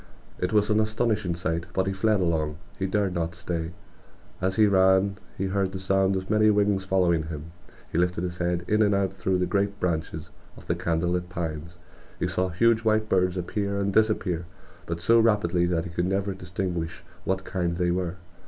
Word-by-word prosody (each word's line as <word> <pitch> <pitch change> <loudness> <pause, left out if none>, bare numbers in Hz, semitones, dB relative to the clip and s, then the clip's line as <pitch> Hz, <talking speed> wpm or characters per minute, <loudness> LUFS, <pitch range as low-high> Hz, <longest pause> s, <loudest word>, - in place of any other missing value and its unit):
It 90 - -1
was 105 -1 +3
an 105 - +4
astonishing 110 -4 0
sight; 85 0 -2
but 95 - +1
he 95 - -1
fled 105 +2 +2
along; 80 -3 0 0.2
he 95 - 0
dared 100 -1 0
not 85 -1 -2
stay. 85 -1 -3 0.7
As 95 +1 0
he 110 - +5
ran 95 0 +4 0.2
he 95 - -1
heard 95 0 0
the 95 - -4
sound 95 +1 +2
of 95 0 -3
many 110 0 +4
wings 100 -2 +2
following 85 -4 +2
him. 80 0 -7 0.4
He 80 - 0
lifted 90 0 +1
his 90 0 -4
head; 85 0 -1
in 105 +1 +2
and 105 -2 +4
out 95 -1 0
through 95 -1 0
the 90 - +1
great 100 +1 0
branches 80 -2 -2 0.3
of - - -13
the - - 0
candle 85 +1 0
lit 90 0 -2
pines 85 -1 -5 0.4
he - - 0
saw 90 0 0
huge 115 +6 +3
white 110 -1 +1
birds 90 -1 +2
appear 100 +3 -2
and 100 0 0
disappear, 95 -6 +1 0.4
but 85 0 -3
so 115 +6 +5
rapidly 100 -6 +3
that 85 -2 0
he 85 - -7
could 85 +1 -1
never 95 +1 0
distinguish 90 -2 -4 0.2
what 95 0 0
kind 85 -3 -2
they 90 -1 +1
were. 90 -1 -1
95 Hz, 200 wpm, -26 LUFS, 85-100 Hz, 0.7 s, he